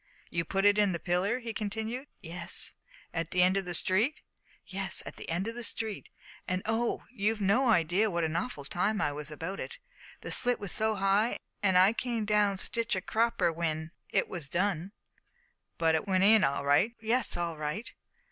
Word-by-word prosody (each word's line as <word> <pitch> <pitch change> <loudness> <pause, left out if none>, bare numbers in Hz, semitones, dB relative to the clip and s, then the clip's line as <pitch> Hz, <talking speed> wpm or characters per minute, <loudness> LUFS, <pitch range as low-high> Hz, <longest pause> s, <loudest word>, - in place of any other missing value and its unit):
"You 170 0 -1
put 195 0 0
it 205 +1 +5
in 205 -3 +3
the 170 - -3
pillar?" 185 +7 0
he 235 -3 -5
continued. 220 +6 -4
"Yes." 170 +1 -1 0.4
"At 165 -1 -2
the 180 0 +3
end 185 +1 +4
of 195 -1 0
the 175 -1 +1
street?" 215 - +2 0.4
"Yes, 190 -1 -1
at - - -7
the - - -7
end 175 +5 -1
of 230 - -3
the 240 - -5
street; 220 -2 -4 0.4
and 185 0 -1
oh, 225 +2 0
you've 215 -1 0
no 220 +6 +3
idea 185 +2 +3
what 170 -3 -1
an 160 0 -1
awful 170 - -3
time 200 +8 0
I 150 - +1
was 150 +1 -6
about 165 +6 -5
it; 480 - -6 0.4
the - - -6
slit 245 -1 +1
was 200 -3 -5
so 220 0 0
high, 195 +3 +2 0.2
an' 190 -2 +3
I 190 +4 +6
come 230 -2 -2
down 210 -2 +2
sitch 230 +3 +1
a 185 - -2
cropper 225 -2 +1
w'en 160 -1 -2 0.2
it - - +1
was 170 -6 -7
done!" 185 0 -1 0.9
"But 165 -1 +3
it 160 +5 0
went 190 -1 +3
in 215 0 +7
all 140 -1 +1
right?" 165 +12 +3
"Yes, 230 0 +1
all 170 -1 -2
right." 155 +10 -4
195 Hz, 195 wpm, -30 LUFS, 170-220 Hz, 0.9 s, in